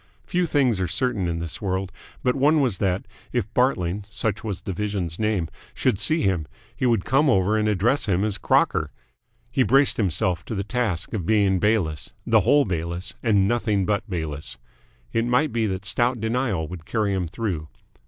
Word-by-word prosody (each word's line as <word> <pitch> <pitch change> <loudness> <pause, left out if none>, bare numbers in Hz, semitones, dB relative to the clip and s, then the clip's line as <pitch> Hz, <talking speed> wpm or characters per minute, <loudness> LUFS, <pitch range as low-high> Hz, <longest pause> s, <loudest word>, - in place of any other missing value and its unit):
Few 180 -1 0
things 130 -10 +2
are 90 - 0
certain 110 - 0
in 85 -1 -2
this 85 -1 -4
world, 95 -1 -2 0.3
but 125 - +3
one 150 +3 +4
was 125 -9 +1
that, 95 -1 0 0.3
if - - 0
Bartling 105 -7 +1
such 105 0 -2
was 105 -4 -4
the 100 - -3
Vision's 95 -4 -3
name 105 -6 0 0.3
should 95 - +1
see 160 0 +2
him, 90 -6 0 0.3
he 130 - 0
would 115 -6 +2
come 135 +4 +3
over 100 -2 +3
and 110 0 +1
address 110 +7 +1
him 95 0 +2
as 105 -2 -1
Crocker. - - +2 0.6
He - - +1
braced 135 +2 +4
himself 90 -3 0
to 110 - -4
the 100 - -1
task 105 -5 -2
of 95 -7 -3
being 100 -4 +3
Bayliss, 85 - 0
the - - +5
whole 145 0 +4
Bayliss, 85 0 -3
and 100 -5 +3
nothing 105 -4 +1
but 105 +1 -1
Bayliss. 80 -5 -4 0.6
It 115 0 +1
might 125 +5 +2
be 115 -2 +1
that 95 0 -4
stout 120 +4 +1
denial 110 -7 -1
would 85 -2 -9
carry 105 -3 0
him 95 -3 -1
through. 85 -5 -3
105 Hz, 185 wpm, -24 LUFS, 90-120 Hz, 0.6 s, the